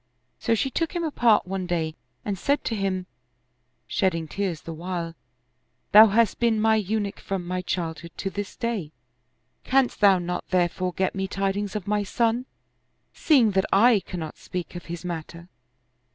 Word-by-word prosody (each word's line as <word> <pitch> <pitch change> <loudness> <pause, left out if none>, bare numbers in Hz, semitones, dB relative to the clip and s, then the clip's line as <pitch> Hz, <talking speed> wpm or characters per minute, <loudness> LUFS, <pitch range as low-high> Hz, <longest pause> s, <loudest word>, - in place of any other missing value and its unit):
So 230 - +1
she 265 +4 -1
took 330 +6 -2
him 345 - -1
apart 240 -9 +3
one 185 0 -3
day 165 -3 -1 0.3
and 205 - -1
said 280 +10 0
to 225 - -2
him, 190 -2 -1 0.8
shedding 165 -4 0
tears 185 -1 -3
the 165 - -7
while, 170 0 -4 0.8
"Thou 215 +2 +10
hast 220 0 +2
been 230 -2 +2
my 220 0 +4
Eunuch 210 -1 -1
from 190 -2 -4
my 180 +1 -2
childhood 170 -2 -3
to 195 - -3
this 205 0 -5
day; 210 -10 -3 0.7
canst 265 -3 +1
thou 200 -2 +7
not 180 0 -4
therefore 180 0 0
get 190 +1 0
me 190 -1 -2
tidings 195 +1 -2
of 205 -4 -3
my 210 0 +1
son, 235 +4 0 0.7
seeing 260 -9 +4
that 190 0 +2
I 220 +2 +6
cannot 170 -5 -7
speak 180 -1 -6
of 175 - -7
his 170 +1 -7
matter? 170 0 -6
195 Hz, 165 wpm, -25 LUFS, 175-220 Hz, 0.8 s, Thou